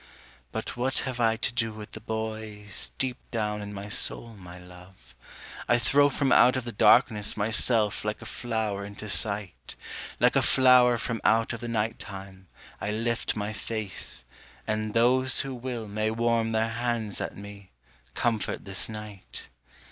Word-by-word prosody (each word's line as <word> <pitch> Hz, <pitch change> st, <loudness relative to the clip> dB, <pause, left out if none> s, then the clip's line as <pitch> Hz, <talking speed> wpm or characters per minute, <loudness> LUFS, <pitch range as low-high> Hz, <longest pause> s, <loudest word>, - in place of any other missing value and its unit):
But -, -, -5 dB
what 130 Hz, +2 st, 0 dB
have 130 Hz, -2 st, -4 dB
I 115 Hz, -1 st, +3 dB
to 125 Hz, -, -1 dB
do 115 Hz, -2 st, -1 dB
with 105 Hz, -1 st, -10 dB
the -, -, -8 dB
boys, 110 Hz, -, -4 dB
deep 130 Hz, -1 st, -1 dB
down 105 Hz, -2 st, -2 dB
in 105 Hz, 0 st, -7 dB
my 100 Hz, 0 st, -7 dB
soul, 110 Hz, +2 st, +1 dB
my 90 Hz, -2 st, -11 dB
love? 90 Hz, -8 st, -15 dB, 0.6 s
I 120 Hz, -, +5 dB
throw 145 Hz, +4 st, +4 dB
from 135 Hz, -1 st, 0 dB
out 125 Hz, +2 st, +6 dB
of 130 Hz, -, -2 dB
the 120 Hz, -, -5 dB
darkness 110 Hz, -1 st, +4 dB
my 105 Hz, +2 st, 0 dB
self 110 Hz, -2 st, +3 dB
like 105 Hz, 0 st, -2 dB
a -, -, -10 dB
flower 110 Hz, -5 st, -3 dB
into 100 Hz, +1 st, -8 dB
sight, 100 Hz, -1 st, 0 dB, 0.4 s
Like -, -, +4 dB
a -, -, +5 dB
flower 125 Hz, -2 st, +5 dB
from 115 Hz, 0 st, -3 dB
out 115 Hz, +2 st, +3 dB
of 115 Hz, -, -5 dB
the 120 Hz, -, -6 dB
night 115 Hz, -1 st, -1 dB
time, 95 Hz, -1 st, -10 dB, 0.3 s
I 100 Hz, -, -2 dB
lift 115 Hz, +2 st, -1 dB
my 105 Hz, 0 st, -3 dB
face, 105 Hz, -, -3 dB, 0.4 s
and 110 Hz, 0 st, -2 dB
those 130 Hz, +3 st, +5 dB
Who 135 Hz, -1 st, -5 dB
will 120 Hz, -3 st, -5 dB
may 110 Hz, +1 st, -1 dB
warm 115 Hz, 0 st, +1 dB
their 110 Hz, 0 st, +1 dB
hands 115 Hz, -2 st, -2 dB
at -, -, -5 dB
me, 100 Hz, -1 st, -11 dB, 0.5 s
comfort 115 Hz, -4 st, -1 dB
this 95 Hz, +2 st, +2 dB
night. 105 Hz, -, -7 dB
110 Hz, 170 wpm, -27 LUFS, 105-120 Hz, 0.6 s, out